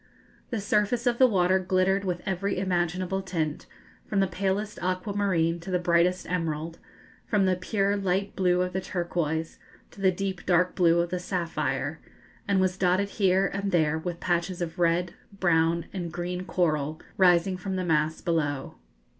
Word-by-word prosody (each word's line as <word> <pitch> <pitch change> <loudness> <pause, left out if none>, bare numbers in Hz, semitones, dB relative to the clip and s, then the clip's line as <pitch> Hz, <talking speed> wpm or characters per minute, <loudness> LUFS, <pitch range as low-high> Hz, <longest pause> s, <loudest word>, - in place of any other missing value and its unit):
The 230 - -2
surface 210 +3 +1
of 240 -1 +1
the 260 - +8
water 190 -3 +3
glittered 185 +1 +1
with 180 -2 -2
every 195 0 -1
imaginable 185 0 -1
tint, 165 -5 -3 0.4
from 200 - 0
the 195 - +4
palest 195 +3 -2
aquamarine 185 -2 0
to 170 +3 -9
the 180 - +2
brightest 175 +1 +2
emerald, 165 -2 -3 0.5
from 205 -3 +2
the 185 -1 +3
pure 195 +2 0
light 195 0 -1
blue 180 -1 +2
of 180 0 -4
the 190 - -1
turquoise 165 -3 -2 0.3
to 200 - -12
the 190 -1 +4
deep 190 0 -4
dark 180 0 +3
blue 170 -1 +4
of 170 0 -3
the 180 - -1
sapphire, 180 -2 -2 0.5
and 200 -1 +2
was 185 0 +1
dotted 190 +2 +2
here 190 -2 +2
and 200 +1 -2
there 160 -2 +2
with 175 +1 -5
patches 175 0 -1
of 170 -1 -4
red, 170 +1 +2 0.3
brown, 165 -1 +2
and 175 -3 -4
green 180 +2 -4
coral, 155 -4 0 0.2
rising 180 0 +4
from 190 +1 -4
the 185 -1 -2
mass 160 -1 +1
below. 145 - -1
180 Hz, 165 wpm, -27 LUFS, 170-190 Hz, 0.5 s, the